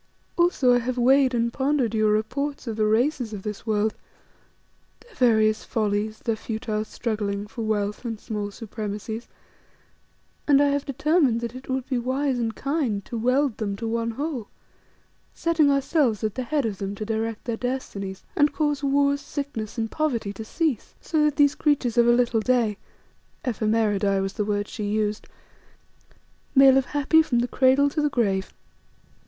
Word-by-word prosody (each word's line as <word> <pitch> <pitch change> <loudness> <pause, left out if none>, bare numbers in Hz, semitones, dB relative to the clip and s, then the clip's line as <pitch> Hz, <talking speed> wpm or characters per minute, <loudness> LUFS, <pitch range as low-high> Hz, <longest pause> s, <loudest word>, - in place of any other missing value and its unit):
Also 345 -8 +3
I 245 - +4
have 250 +1 -3
weighed 260 +1 +4
and 235 0 0
pondered 265 -4 0
your 215 -1 +3
reports 265 +8 -2
of 225 -3 -3
the 215 -1 +1
races 240 +1 +1
of 195 -2 -6
this 210 +1 -6
world; 215 0 +1 1.1
their 465 0 -20
various 220 - +3
follies, 215 0 -1
their 230 - 0
futile 220 -1 -3
struggling 210 -3 -3
for 225 +2 -8
wealth 210 -1 -1
and 225 -3 -4
small 210 -3 -4
supremacies, 215 +1 -6 1.2
and 280 -2 +6
I 285 0 +4
have 285 +1 -1
determined 280 -3 +2
that 235 -1 -4
it 260 +1 -11
would 260 -1 -2
be 255 -3 0
wise 260 +1 -1
and 225 -2 -2
kind 270 -8 -1
to - - -7
weld 250 +2 +1
them 200 -3 -2
to 225 +3 -5
one 230 0 -1
whole, 265 -2 -4 0.9
setting 330 -3 +2
ourselves 275 - +1
at 215 -2 0
the 255 - -3
head 295 -1 0
of 205 -4 -3
them 200 0 -4
to 215 - -5
direct 225 0 -3
their 235 -1 -1
destinies, 205 -7 -4
and 295 0 +4
cause 295 -1 0
wars, 280 0 +2
sickness, 260 -8 -5
and 225 -1 -2
poverty 240 -10 -1
to 220 - -7
cease, 295 - -2
so 310 -2 0
that 300 -1 +1
these 285 -1 +4
creatures 285 -6 +1
of 235 -1 +4
a - - +6
little 240 -1 +2
day 230 -4 +1 0.7
(ephemeridae 215 -4 +1
was 195 0 -2
the 210 - -2
word 205 0 -1
she 215 - -6
used) 210 0 -1 1.3
may 270 0 +8
live 265 0 +3
happy 295 +2 +3
from 260 -6 0
the 240 +1 +1
cradle 265 +3 +4
to 300 +2 -1
the 295 - +2
grave. 200 -8 0
235 Hz, 170 wpm, -24 LUFS, 215-275 Hz, 1.3 s, may